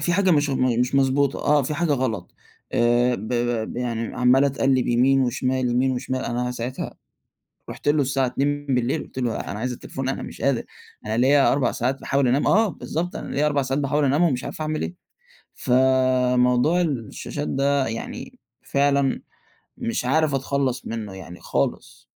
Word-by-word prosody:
في 175 - 0
حاجة 190 -1 +3
مش 145 -3 +3
م 125 -3 +1
مش 125 +2 0
مضبوطة، 135 0 +2
آه 145 -1 +3
في 150 +4 -3
حاجة 170 -2 +1
غلط، 115 -9 -2 0.4
آآ، 120 +1 +3
ب 110 -1 -6
ب 120 -2 -1
ب - - -9
ي 125 - -2
يعني 115 -2 -3
عمَّال 125 +2 +4
أتقلِّب 135 -2 +1
يمين 130 +3 +3
وشمال 130 0 0
يمين 130 +2 +2
وشمال، 130 +1 -3
أنا 125 +1 -2
ساعتها 125 +1 -5 0.8
رُحت - - -5
له 145 0 +3
الساعة 135 0 0
02:00 140 0 -1
قُلت - - -10
له 120 -3 -1
أنا 100 - -5
عايز 125 +2 -2
التليفون، 130 +2 -5
أنا 135 - -3
مش - - -9
قادر، 135 -3 +1 0.4
أنا 110 - -1
ليَّ 130 +4 +4
4 135 -3 +2
ساعات 130 +3 -2
باحاول 140 -2 +1
أنام، 130 +4 +2
آه 220 +1 +4
بالضبط، 170 +2 -4
أنا - - -6
ليَّ 150 +2 +2
4 145 -2 +1
ساعات 135 +2 -1
باحاول 145 +2 +1
انامهم 145 +6 +3
ومش 130 -4 -2
عارف - - -7
أعمل 155 0 -2
إيه، - - -4 0.6
فموضوع 130 +3 +3
الشاشات 115 - -3
ده 140 - +1
يعني 115 0 -7 0.2
فعلًا 140 -1 +1 0.5
مش 115 - -3
عارف 150 +2 +2
أتخلَّص 135 -1 -1
منه 110 -4 -5
يعني 90 -2 -10
خالص. - - -3
130 Hz, 175 wpm, -23 LUFS, 125-140 Hz, 0.8 s, عمَّال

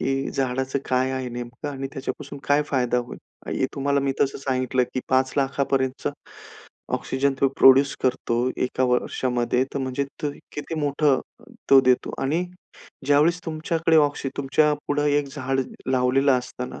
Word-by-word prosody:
की 135 +1 -1
झाडाचं 130 +1 -1
काय 130 0 +1
आहे 130 -1 -3
नेमकं 120 +4 -6
आणि 135 -1 -4
त्याच्यापासून 140 0 -6
काय 145 +1 +3
फायदा 125 -3 +1
होईल. 120 - -6 0.3
हे 130 - 0
तुम्हाला 140 0 +1
मी 135 0 0
तसं 135 0 +1
सांगितलं, 130 -1 0
की 130 - 0
5 130 0 +2
लाखापर्यंतचं 135 -1 0 0.8
ऑक्सिजन 135 +1 0
तो 135 - +4
प्रोड्यूस 135 +1 +6
करतो, 125 -1 0
एका 130 0 0
वर्षामध्ये. 125 0 0
तर - - 0
म्हणजे 130 +1 -2 0.5
किती 150 +2 -5
मोठं 145 -1 +2 0.2
अ, - - -17 0.3
तो 135 -1 +9
देतो 125 -1 +2
आणि 160 +7 0 0.6
ज्यावेळेस 155 +5 +4
तुमच्याकडे 160 0 0
ऑक्सी 145 -2 +2
तुमच्या 145 +2 +2 0.2
पुढे 145 0 +1
एक 145 -1 -3
झाड 135 -2 -1 0.3
लावलेलं 130 +2 +3
असताना, 125 0 -7
135 Hz, 145 wpm, -24 LUFS, 130-145 Hz, 0.8 s, तो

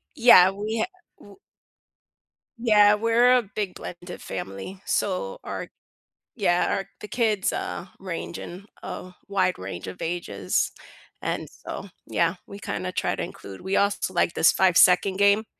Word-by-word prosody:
Yeah, 230 -8 +8
we 210 +3 -3
ha - - +2 0.3
w 200 -1 -16 1.2
Yeah, 210 -3 +5
we're 235 +3 +4
a - - +2
big 205 -4 -2
blended 175 0 -8
family. 95 - -6
So - - -1
our - - -5 0.7
Yeah, 180 -5 +2
our 195 0 -5
the 210 - -8
kids, 215 -4 +1
uh, - - -4
range 180 -3 -5
in 185 +3 -9 0.2
a 180 0 -7
wide 185 -2 +1
range 95 -1 -6
of 95 - -8
ages. 105 - -1 0.5
And - - -3
so, 200 - -8 0.2
yeah, 170 +2 +1
we 200 - -9
kinda 90 - -4
try - - -1
to - - -4
include 95 -1 -9
we 190 +1 -2
also 200 -2 +1
like 170 - +2
this 160 - +5
5 185 -2 +3
second 185 +1 +5
game. 200 +2 +4
190 Hz, 150 wpm, -25 LUFS, 175-210 Hz, 1.2 s, Yeah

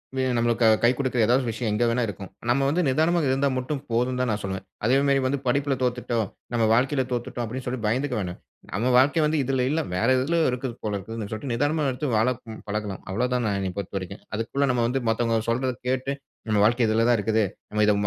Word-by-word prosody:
இல்லனா 130 -1 0
நம்மளுக்கு 115 0 +2 0.2
கை 120 - +7
கொடுக்குற 130 -3 -1
ஏதாவது 125 +4 +3
ஒரு 120 - -1
விஷயம் 110 0 -2
எங்க 105 +3 +2
வேணா 120 +1 +1
இருக்கும். 100 -2 -7 0.2
நம்ம 130 +3 +3
வந்து 165 +5 +1
நிதானமா 160 +6 +2
இருந்தா 135 +2 +2
மட்டும் 130 +2 -2
போதும்னு 125 +2 +1
தான் 125 - 0
நான் 105 0 -2
சொல்வேன். 95 0 -4 0.2
அதே 130 +4 +4
மாரி 140 -1 +3
வந்து 135 +2 0
படிப்புல 140 +2 +1
தோத்துட்டோம், 120 -4 -1 0.2
நம்ம 115 -2 +2
வாழ்க்கைல 130 +3 +2
தோத்துட்டோம் 120 0 -3
அப்டின்னு 125 +3 -6
சொல்ட்டு 125 -3 -3
பயந்துக்க 125 +4 0
வேணா. 90 -3 -3 0.4
நம்ம 115 +7 +1
வாழ்க்க 145 +4 +4
வந்து 150 -1 +1
இதுல 130 -1 0
இல்ல. 155 +3 +1 0.2
வேற 105 +5 +1
எதுலையோ 160 +5 +1
இருக்குது 125 0 -3
போல 105 - -2
இருக்குதுனு, 105 +2 -6
சொல்ட்டு 125 +4 -4
நிதானமா 145 +6 +1
எடுத்து 130 +4 -3
வாழப் 115 +3 +2 0.3
பழகனும். 105 -2 -3
அவ்ளோ 110 +6 0
தான் 125 -2 +1
என்ன 95 -2 -2
பொறுத்தவரைக்கும். 100 0 -5
அதுக்குள்ள 115 +6 0
நம்ம 125 -1 +1
வந்து, 130 +3 0
மத்தவங்க 115 -1 +1
சொல்றத 130 +2 0
கேட்டு, 130 +1 0 0.4
நம்ம 105 -1 +2
வாழ்க்க 120 +3 +3
இதுல 110 +1 +2
தான் 120 - +4
இருக்குது. 110 +1 +1 0.3
நம்ம 105 0 +1
இத 105 - +4
120 Hz, 210 wpm, -25 LUFS, 110-130 Hz, 0.4 s, கை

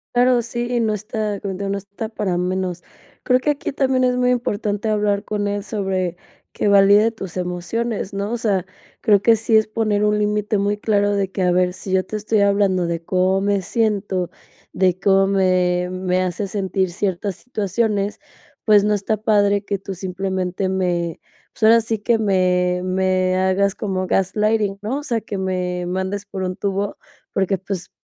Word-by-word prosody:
Claro, 245 0 +4
sí, 240 +1 -2
no 220 -2 +1
está, 210 -1 -3
como 195 -1 -4
te - - -9
digo, 195 - -2
no 200 - -1
está 200 +3 -7
para 210 -5 -2
menos. 180 -1 -2 0.4
Creo 250 0 +3
que 295 +3 +1
aquí 290 - -4
también 265 -2 +1
es 250 0 +2
muy 250 0 +3
importante 215 -3 -1
hablar 205 -1 +1
con 205 -1 -2
él 205 0 -2
sobre 190 -4 -2 0.3
que - - -1
valide 200 +2 +6
tus 190 -5 -8
emociones, 190 +5 -3
¿no?, 200 +1 -3
o 240 - -1
sea, 200 -5 0 0.4
creo 205 -4 +4
que 230 +2 +5
sí 225 +1 +1
es 220 0 +4
poner 215 -1 0
un 210 0 +2
límite 210 0 0
muy 205 +1 0
claro 205 -1 +1
de 195 -1 0
que: 190 - -2
"A 180 - +3
ver, 180 0 +2
si 190 - -7
yo 190 0 +3
te 215 - -7
estoy 215 +1 0
hablando 200 -3 +2
de 170 0 -3
cómo 185 +1 +2
me 200 0 +1
siento, 200 -3 -1 0.4
de 185 -1 +2
cómo 195 0 +4
me 180 -2 +2
me 185 0 0
hace 185 +3 -2
sentir 190 -1 -1
ciertas 190 +1 -2
situaciones, 210 -2 -1 0.5
pues, 210 -2 +6
no 210 0 +2
está 205 +2 -1
padre 205 -1 +2
que 200 0 -2
tú, 195 0 -7
simplemente, 190 0 -2
me 175 -3 -1 0.3
pues, - - -20
ahora 230 +1 +7
sí 225 -1 -2
que, 230 +2 +2
me 180 -3 +1
me 185 0 +1
hagas 190 +1 +2
como 190 -4 -2
gaslighting, 205 +2 +1
¿no?, 220 +6 -2
o 290 - -5
sea, 235 -6 -1
que 205 -2 -5
me 180 -1 -2
mandes 190 +3 -3
por 200 -1 -6
un 185 0 -2
tubo, 200 +1 -2 0.3
porque, 195 0 0
pues, 185 -1 -5
200 Hz, 185 wpm, -21 LUFS, 185-215 Hz, 0.5 s, ahora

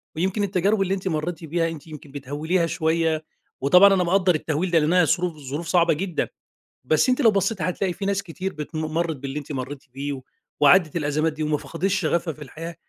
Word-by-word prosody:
ويمكن 190 +5 0
التجارب 195 +2 +1
اللي 190 0 +1
أنتِ 190 -1 -3
مرّيتِ 165 0 -2
بيها 165 +1 0
أنتِ 165 -1 -9
يمكن 150 -2 -11
بتهوّليها 150 +6 -1
شويّة، 160 -1 0 0.4
وطبعًا 180 +8 +7
أنا 185 -2 +2
مقدّر 180 0 +3
التهويل 160 +4 -1
ده 165 - +5
لأنها 165 +3 +3
ظروف 175 -1 0
ظروف 145 +4 -5
صعبة 170 -2 +3
جدًا، 175 +1 -2 0.6
بس 155 - +2
أنتِ 255 - +2
لو 225 - +6
بصّيتِ 195 -2 0
هتلاقي 180 +1 -1
في 195 - -6
ناس 200 0 0
كتير 185 +2 -5
بت 150 +2 -8
مرّت 160 +1 -1
باللي 135 +2 -5
أنتِ 150 0 -7
مرّيتِ 135 +1 -5
بيه 140 +1 -3
و 130 - -7 0.4
وعدّت 160 +2 +5
الأزمات 155 +1 0
دي 155 +1 -5
وما 150 0 +1
فقدتش 185 +3 -2
شغفها 170 -3 0
في 150 - -12
الحياة. 165 +5 -8
165 Hz, 200 wpm, -24 LUFS, 150-185 Hz, 0.6 s, وطبعًا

